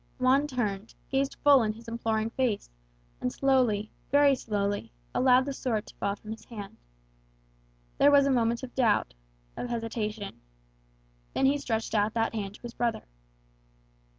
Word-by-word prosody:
Juan 265 +3 +3
turned, 220 -6 -3 0.2
gazed 275 0 0
full 285 -3 +7
in 215 -1 0
his 230 +2 -14
imploring 225 -1 -1
face, 235 - -1 0.5
and 125 - -1
slowly, 245 - +2 0.2
very 285 0 +5
slowly, 205 -5 -2 0.2
allowed 255 0 +4
the 280 - -3
sword 230 -5 -2
to - - -14
fall 200 - -1
from 215 +1 -10
his 225 - -8
hand. 205 -4 -9 1.2
There 285 - +7
was 285 -1 +6
a 280 - +2
moment 235 -1 +1
of 255 - -7
doubt, 220 - +2 0.4
of 245 - -4
hesitation. 220 -3 -4 0.9
Then 270 - +2
he 280 +2 +3
stretched 225 -5 -2
out 215 0 +1
that 225 0 +1
hand 205 -2 -4
to - - -16
his 240 -1 -7
brother. 235 -1 -1
230 Hz, 155 wpm, -28 LUFS, 215-260 Hz, 1.2 s, full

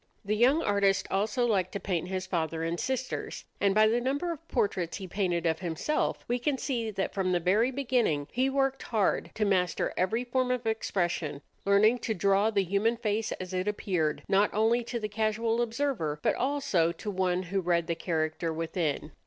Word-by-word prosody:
The 210 +1 0
young 265 +9 +4
artist 200 -1 +2
also 215 +5 +1
liked 190 -6 +1
to 200 - -2
paint 180 -5 -2
his 185 0 -3
father 165 -2 -2
and 165 +1 -2
sisters; 260 -1 -3
and 200 -1 +2
by 215 0 +6
the 235 +2 +2
number 285 +7 -1
of 330 0 -8
portraits 195 -8 -1
he 195 - -6
painted 175 -2 -1
of 160 -1 +1
himself, 175 - -1
we 245 +1 0
can 275 +2 0
see 240 -5 -2
that 195 -2 -3
from 190 -2 0
the 175 - +2
very 200 +8 +3
beginning 245 - 0
he 260 +2 +1
worked 270 0 0
hard 215 -5 0
to 215 - +1
master 180 -4 +1
every 220 +7 0
form 250 +1 0
of 250 -2 -1
expression, 175 -9 -1 0.2
learning 215 +5 +4
to 220 -2 -2
draw 200 +3 +3
the 200 -3 +1
human 200 +6 +1
face 220 -1 -1
as 185 0 -7
it 185 +2 -1
appeared 180 -7 -1
not 200 +2 +3
only 225 +3 +3
to 240 0 -3
the 215 - -2
casual 220 +2 0
observer, 230 - -1
but - - +3
also 250 - +1
to 205 +4 -5
one 185 -1 0
who 190 +2 -1
read 170 -1 +1
the 170 - -1
character 165 0 -2
within. 160 -2 -2
200 Hz, 195 wpm, -29 LUFS, 180-235 Hz, 0.2 s, by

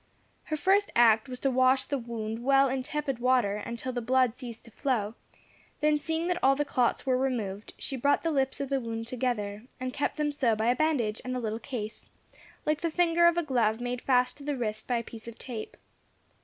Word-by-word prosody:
Her 310 - -2
first 390 +5 +3
act 225 0 +5
was 250 -1 -6
to 270 - +2
wash 260 +1 +4
the 280 -2 -2
wound 230 -1 -5
well 275 +1 +5
in 265 0 -1
tepid 275 -2 -3
water 245 -5 +2
until 235 +4 -5
the 245 - -2
blood 255 0 +2
ceased 240 -4 -9
to 235 - -14
flow; 225 -5 -1 0.7
then 300 0 +3
seeing 325 +2 -2
that 360 0 0
all 270 +1 +6
the 295 +1 0
clots 250 -4 +1
were 255 -1 +2
removed, 220 -6 -2
she 275 - -4
brought 285 +3 +2
the 330 - +1
lips 270 -2 0
of 280 -1 -3
the 275 -1 0
wound 225 -1 -4
together, 230 -4 -2 0.2
and 255 0 -3
kept 290 - -1
them 300 -1 +1
so 255 -6 +2
by 220 +3 +2
a - - +1
bandage 250 -8 +1
and 255 0 -3
a - - -1
little 220 -1 -3
case, 225 -4 -6 0.6
like 305 0 +1
the 335 - 0
finger 340 +1 +4
of 340 0 +3
a 345 - +2
glove 235 -6 +1
made 245 0 -3
fast 250 -1 +2
to 285 - -12
the 290 -1 -2
wrist 215 -3 -3
by 245 - +1
a 235 - -2
piece 230 0 -11
of 235 - -8
tape. 235 -4 -7
255 Hz, 225 wpm, -29 LUFS, 230-280 Hz, 0.7 s, all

